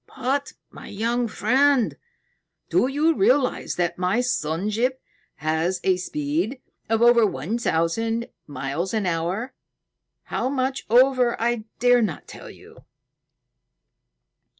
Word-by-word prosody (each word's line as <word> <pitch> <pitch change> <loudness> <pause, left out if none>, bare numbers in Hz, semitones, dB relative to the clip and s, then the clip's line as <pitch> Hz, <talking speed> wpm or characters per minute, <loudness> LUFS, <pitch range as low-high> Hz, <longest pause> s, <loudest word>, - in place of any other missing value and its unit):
"But, 270 +2 -1 0.2
my - - -11
young 235 +3 -1
friend, 255 +4 +2 0.8
do - - +3
you 300 +4 +2
realize 255 +3 +1
that 175 0 -1
my 185 +6 +1
sun 195 -5 -1
ship 250 +5 0 0.4
has 160 +4 -1
a 190 - +3
speed 285 - -2 0.3
of 225 +1 +2
over 240 -1 +6
one 200 - -1
thousand 225 +6 0 0.2
miles 145 - -3
an 215 -3 0
hour, 180 +8 -2 0.7
how 255 - -2
much 265 0 -2
over 250 0 +4
I 235 -1 -1
dare 245 0 +4
not 200 -9 -3
tell - - -11
you?" - - -16
230 Hz, 120 wpm, -23 LUFS, 180-255 Hz, 0.8 s, over